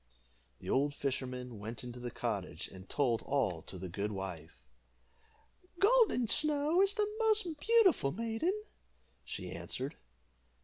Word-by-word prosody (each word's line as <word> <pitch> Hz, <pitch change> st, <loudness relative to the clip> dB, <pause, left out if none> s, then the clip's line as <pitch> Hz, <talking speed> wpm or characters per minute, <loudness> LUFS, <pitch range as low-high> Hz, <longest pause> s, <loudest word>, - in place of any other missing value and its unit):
The -, -, -12 dB
old 145 Hz, +2 st, +2 dB
fisherman 125 Hz, -4 st, -3 dB
went 110 Hz, +4 st, -5 dB
into 125 Hz, 0 st, -7 dB
the 120 Hz, 0 st, -4 dB
cottage, 110 Hz, -6 st, -3 dB
and 95 Hz, 0 st, -12 dB
told 125 Hz, -6 st, +1 dB
all 110 Hz, -, 0 dB
to 95 Hz, -, -7 dB
the 90 Hz, +1 st, -5 dB
good 100 Hz, +4 st, -3 dB
wife. 80 Hz, -10 st, -7 dB, 1.1 s
"Golden 415 Hz, -, +5 dB
Snow 300 Hz, -, +3 dB
is 395 Hz, +1 st, +3 dB
the 420 Hz, -1 st, +2 dB
most 435 Hz, -2 st, +3 dB
beautiful 415 Hz, -, +4 dB
maiden," 230 Hz, -, -1 dB, 0.6 s
she -, -, -6 dB
answered. 135 Hz, +5 st, -4 dB
135 Hz, 130 wpm, -34 LUFS, -, 1.1 s, Golden